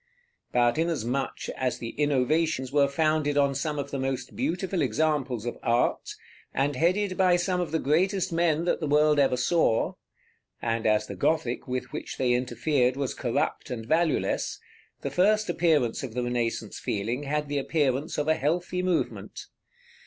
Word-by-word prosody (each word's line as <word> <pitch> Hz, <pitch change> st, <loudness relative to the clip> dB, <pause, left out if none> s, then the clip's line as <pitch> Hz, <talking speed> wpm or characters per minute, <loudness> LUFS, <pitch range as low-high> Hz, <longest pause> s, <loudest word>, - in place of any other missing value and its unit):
But 120 Hz, +4 st, +2 dB
inasmuch 140 Hz, -5 st, -1 dB
as 130 Hz, -1 st, -1 dB
the 115 Hz, -, -5 dB
innovations 145 Hz, 0 st, +1 dB
were 140 Hz, -1 st, +4 dB
founded 155 Hz, 0 st, +1 dB
on 140 Hz, -1 st, +3 dB
some 150 Hz, +2 st, -2 dB
of 140 Hz, 0 st, -4 dB
the 140 Hz, -, -3 dB
most 130 Hz, -1 st, -3 dB
beautiful 180 Hz, +2 st, -1 dB
examples 135 Hz, -2 st, 0 dB
of 120 Hz, -, -4 dB
art, 120 Hz, +1 st, 0 dB, 0.4 s
and 140 Hz, +1 st, +1 dB
headed 185 Hz, +6 st, +1 dB
by 185 Hz, -2 st, +4 dB
some 180 Hz, +1 st, 0 dB
of 175 Hz, -, -2 dB
the 160 Hz, -, +1 dB
greatest 180 Hz, +5 st, +1 dB
men 165 Hz, -1 st, +1 dB
that -, -, +1 dB
the 155 Hz, -, -2 dB
world 150 Hz, +1 st, +4 dB
ever 135 Hz, -2 st, +3 dB
saw, 125 Hz, -6 st, +2 dB, 0.7 s
and 115 Hz, -1 st, -1 dB
as 105 Hz, 0 st, +3 dB
the 100 Hz, -, -7 dB
Gothic 125 Hz, -, 0 dB
with 125 Hz, -1 st, -4 dB
which -, -, -5 dB
they 125 Hz, -2 st, +2 dB
interfered 125 Hz, +1 st, +1 dB
was 140 Hz, -2 st, -2 dB
corrupt -, -, -2 dB
and 115 Hz, -3 st, -5 dB
valueless, 160 Hz, +4 st, 0 dB, 0.4 s
the -, -, -3 dB
first 210 Hz, +4 st, +3 dB
appearance 155 Hz, -9 st, +2 dB
of 125 Hz, -4 st, -6 dB
the 125 Hz, -, -1 dB
Renaissance 120 Hz, -3 st, -2 dB
feeling 115 Hz, +6 st, -2 dB
had 150 Hz, +1 st, -2 dB
the 145 Hz, 0 st, -1 dB
appearance 145 Hz, +1 st, 0 dB
of 150 Hz, 0 st, -1 dB
a 160 Hz, -, +5 dB
healthy 175 Hz, +4 st, -1 dB
movement. 180 Hz, -3 st, -2 dB
145 Hz, 165 wpm, -27 LUFS, 125-165 Hz, 0.7 s, a